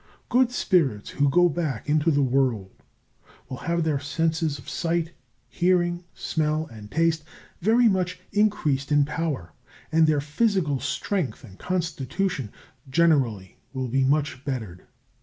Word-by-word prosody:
Good 250 0 +4
spirits 155 - +1
who 140 0 +2
go 175 +5 +5
back 150 -8 -3
into 150 +2 +2
the 145 -2 +3
world 125 -7 +1 0.8
will 130 - -6
have 170 0 +1
their 155 -3 0
senses 160 +1 -1
of 130 - -14
sight, 165 0 -1 0.4
hearing, 175 -1 +1
smell, 155 0 -1
and 105 -2 -11
taste 160 +1 +1 0.4
very 230 +6 +4
much 185 -3 0
increased 160 -10 +1
in 145 -1 +4
power, 150 - -3 0.4
and 160 0 +4
their 155 -2 +3
physical 150 - 0
strength 185 -4 -2
and 95 -6 -14
constitution 170 - -2 0.4
generally 130 - +2 0.2
will 130 -2 -3
be 135 +3 +2
much 140 -1 0
bettered. 110 -11 -5
155 Hz, 135 wpm, -25 LUFS, 135-175 Hz, 0.8 s, go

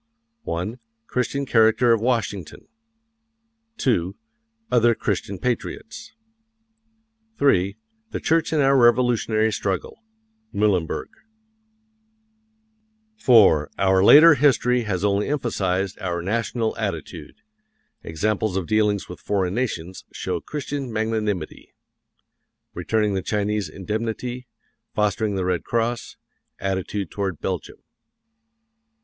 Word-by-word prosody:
1. 90 +9 -3 0.3
Christian 135 +4 -2
character 115 0 +4
of 115 - 0
Washington. 115 -7 -2 1.1
2. 95 -8 0 0.6
Other 120 -1 +4
Christian 100 -1 -2
patriots. 125 - -4 1.2
3. 100 -7 +2 0.3
The - - -4
Church 165 0 +1
in 155 -2 +2
our 135 0 +4
Revolutionary 120 -3 +3
struggle. 95 -2 -3 0.5
Muhlenberg. 100 -6 0 2.1
IV. 95 - +5
OUR 95 -1 +3
LATER 155 +9 +9
HISTORY 125 -3 +2
HAS 95 -2 -1
ONLY 100 0 +1
EMPHASIZED 100 -9 -1
OUR 85 -2 -3
NATIONAL 115 +3 -1
ATTITUDE. 95 -6 -5 0.7
Examples 100 +4 -1
of 95 - -2
dealings 105 0 +1
with 90 - -9
foreign 95 -3 -1
nations 95 -7 -3
show - - -3
Christian 145 -3 -5
magnanimity. 110 -6 -3 1.0
Returning 105 -2 0
the 95 - -1
Chinese 105 -2 -1
Indemnity; 115 +7 -4 0.5
fostering 105 0 0
the 95 -1 -1
Red 90 -1 -1
Cross; 115 +1 -2 0.4
attitude 95 0 -3
toward 95 -5 -3
Belgium. - - -5
105 Hz, 95 wpm, -23 LUFS, 95-120 Hz, 2.1 s, LATER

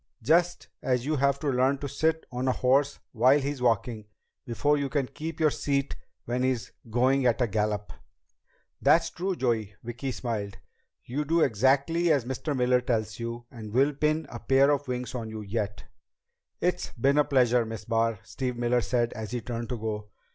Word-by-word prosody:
Just 175 +7 +2
as 125 -1 0
you 155 +1 0
have 140 0 +2
to 150 - -2
learn 130 +1 +2
to 140 +1 -5
sit 160 +3 0
on 125 +1 -2
a - - +4
horse 135 +3 +2
while 130 +5 +4
he's 140 -1 -3
walking, 115 -2 0 0.4
before 120 +6 +2
you 140 -1 -1
can 140 -1 0
keep 160 +6 -7
your 155 -2 +4
seat 140 -1 -1 0.3
when 125 +1 -1
he's 130 -3 -1 0.2
going 130 +3 +3
at 120 - +2
a 125 - +3
gallop." 105 -1 -2 0.9
"That's - - +4
true, 185 +1 -2
Joey." 115 - -1
Vicki 120 +3 -4
smiled. 105 -6 -4 0.5
"You 140 +5 -2
do 165 +3 +2
exactly 140 +8 +3
as 140 -6 +2
Mr. 130 +3 -3
Miller 125 0 +3
tells 110 -4 -2
you, 115 0 -5
and 110 -4 -9
we'll 140 +4 +3
pin 155 +2 0
a 120 - -7
pair 135 +3 +4
of 145 -1 0
wings 125 0 -3
on 115 -3 -4
you 110 0 -6
yet." 100 -2 -3 0.8
"It's 180 0 0
been 140 +5 +2
a - - +6
pleasure, 125 -4 +3
Miss 110 -1 -7
Barr," 115 -2 0
Steve 125 -3 -4
Miller 120 0 +2
said 120 0 0
as 110 -1 -6
he 120 0 -3
turned 115 -1 -5
to 125 - -2
go. 105 -1 -4
125 Hz, 185 wpm, -27 LUFS, 115-140 Hz, 0.9 s, a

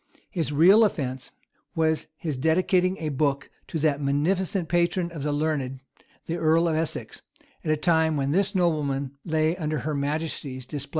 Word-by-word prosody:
His 165 -7 -2
real 180 +9 +6
offence 130 -10 -2 0.5
was 160 -1 +1
his 155 -3 -3
dedicating 180 +6 +2
a 155 - -3
book 140 -1 -1 0.2
to - - -3
that 150 -2 +1
munificent 165 +6 0
patron 175 +1 +1
of 160 -4 -7
the 150 +1 -1
learned, 145 -3 -1 0.5
the 170 - -3
earl 165 +1 +3
of 160 - +1
Essex, 160 -1 -3 0.4
at 155 - -3
a 155 - +3
time 160 -1 +2
when 140 0 0
this 195 +4 +1
nobleman 145 -6 0
lay 160 0 +1
under 155 -4 -2
her 155 - -2
majesty's 140 -2 -3
displeasure. 145 +1 -6
155 Hz, 165 wpm, -25 LUFS, 145-170 Hz, 0.5 s, real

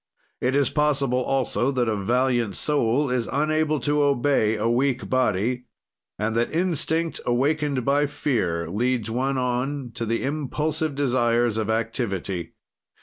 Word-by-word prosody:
It 130 +2 +1
is 140 -3 +2
possible 140 -4 +1
also 130 -1 0
that 125 -2 +1
a 110 - +1
valiant 120 +1 +1
soul 140 -1 +1
is 125 -2 -1
unable 155 +1 +1
to 145 0 +1
obey 140 -5 +2
a 110 +1 -1
weak 130 +2 +1
body, 125 0 +1 0.5
and 110 +2 -1
that 115 +1 +1
instinct, 165 -1 0
awakened 140 +1 0
by 145 +1 +3
fear, 105 - -1
leads 115 +4 -1
one 135 +3 0
on 125 +1 -2
to 115 - -4
the 115 +1 -1
impulsive 150 +2 -2
desires 120 -4 +1
of 110 -1 -2
activity. 100 -7 -2
125 Hz, 140 wpm, -24 LUFS, 115-145 Hz, 0.5 s, by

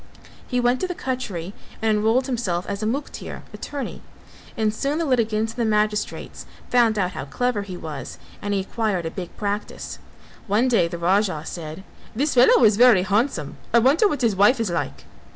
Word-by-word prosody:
He 250 - 0
went 245 +1 +2
to 370 - -1
the 360 - -4
cutcherry 205 - -4 0.3
and 220 -1 +2
enrolled 225 +5 +2
himself 215 -9 -1
as 200 0 -4
a 215 - 0
muktear 275 +6 -4
(attorney) 285 -2 -6 0.6
and 215 -1 +1
soon 280 +7 -1
the 335 - 0
litigants 225 -4 +1
and 240 - -4
the 225 - +2
magistrates 210 0 -1 0.2
found 235 -3 +4
out 185 -2 +1
how 135 - -6
clever 245 - -1
he 190 -3 -7
was 155 -5 -7 0.2
and 205 - -3
he 195 - +1
acquired 195 -3 -2
a 165 - -3
big 180 -1 -7
practice. 205 0 -4 0.5
One 215 +5 +2
day 225 -9 +3
the 170 - -5
Raja 185 -2 +1
said, 160 +2 -7 0.3
"This 285 +6 +1
fellow 250 0 +6
is 210 -2 +5
very 235 -6 +6
handsome, 200 - 0 0.2
I - - +8
wonder 275 - +5
what 295 -8 -2
his 225 -4 +3
wife 210 +7 +5
is 220 -6 -1
like?" 170 - -3
215 Hz, 190 wpm, -23 LUFS, 190-245 Hz, 0.6 s, I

